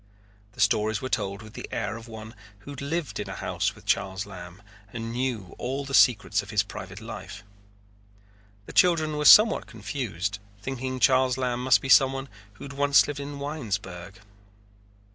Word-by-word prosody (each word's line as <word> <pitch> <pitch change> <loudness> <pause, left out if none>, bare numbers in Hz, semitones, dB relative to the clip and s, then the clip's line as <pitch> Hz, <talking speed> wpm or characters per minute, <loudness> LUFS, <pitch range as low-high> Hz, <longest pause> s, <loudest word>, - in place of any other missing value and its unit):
The - - -18
stories 110 0 +2
were 130 - -5
told 100 -2 -2
with 110 0 -13
the - - -8
air 100 - -3
of 115 +1 -10
one 110 -1 -9 0.3
who 145 - -10
had 140 - -8
lived 155 +2 -3
in - - -5
a - - -6
house - - -2
with - - -17
Charles 95 0 0
Lamb 90 -1 -11 0.3
and 115 0 -5
knew 120 -7 -3
all 135 +3 -3
the 135 - -7
secrets 110 -5 +4
of 100 - -13
his 105 -3 +2
private 100 -1 -9
life. 105 -2 -9 1.2
The - - -10
children 160 -4 +3
were 150 0 -2
somewhat 215 +6 +7
confused, 105 -3 -4 0.2
thinking 130 +3 -4
Charles 130 0 +3
Lamb 125 -1 -2
must 130 0 +4
be - - -3
someone 135 +1 +4 0.2
who 100 - -13
had 140 - -8
once 140 0 +4
lived 145 -1 -5
in 140 0 -6
Winesburg. 100 - -5
120 Hz, 175 wpm, -26 LUFS, 100-135 Hz, 1.2 s, somewhat